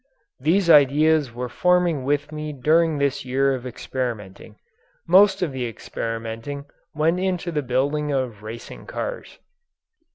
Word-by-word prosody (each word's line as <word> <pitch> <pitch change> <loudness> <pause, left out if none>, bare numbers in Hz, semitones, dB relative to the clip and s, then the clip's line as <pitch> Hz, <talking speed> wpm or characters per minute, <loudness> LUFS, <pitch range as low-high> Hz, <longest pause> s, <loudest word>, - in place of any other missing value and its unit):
These 170 +7 +2
ideas 150 -1 +5
were 125 +2 -4
forming 175 +1 +2
with 145 +2 -1
me 155 0 -5
during 155 +3 +2
this 140 -1 0
year 135 +1 +1
of 130 -1 -5
experimenting. 120 -6 -5 0.5
Most 195 0 +5
of 165 - -1
the 130 -2 -3
experimenting 115 +4 -5 0.3
went 160 +4 +2
into 180 -2 -1
the 150 -2 -1
building 145 +3 0
of 125 -7 -2
racing 110 +2 -9
cars. - - -5
140 Hz, 130 wpm, -23 LUFS, 125-160 Hz, 0.5 s, ideas